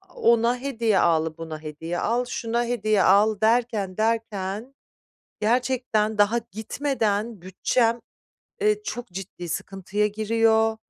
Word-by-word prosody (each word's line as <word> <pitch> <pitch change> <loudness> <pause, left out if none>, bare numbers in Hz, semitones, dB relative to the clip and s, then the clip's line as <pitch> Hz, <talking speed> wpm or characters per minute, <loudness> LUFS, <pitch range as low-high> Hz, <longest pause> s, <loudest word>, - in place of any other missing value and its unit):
ona 235 +1 +3
hediye 230 -6 +1
al, 160 -1 +2
buna 160 -2 -7
hediye 160 +3 -5
al, 240 +2 0
şuna 235 -1 -2
hediye 215 -4 +1
al 205 +2 +4
derken, 220 -4 +1
derken, 220 +1 -2 0.6
gerçekten 230 -2 +1
daha 205 +3 +4
gitmeden 220 -2 -2
bütçem, 225 +6 +1 0.6
eee, 425 0 +2
çok 245 -12 -5
ciddi 180 -1 -8
sıkıntıya 195 +4 -2
giriyor. 220 +1 +2
220 Hz, 110 wpm, -24 LUFS, 195-235 Hz, 0.6 s, al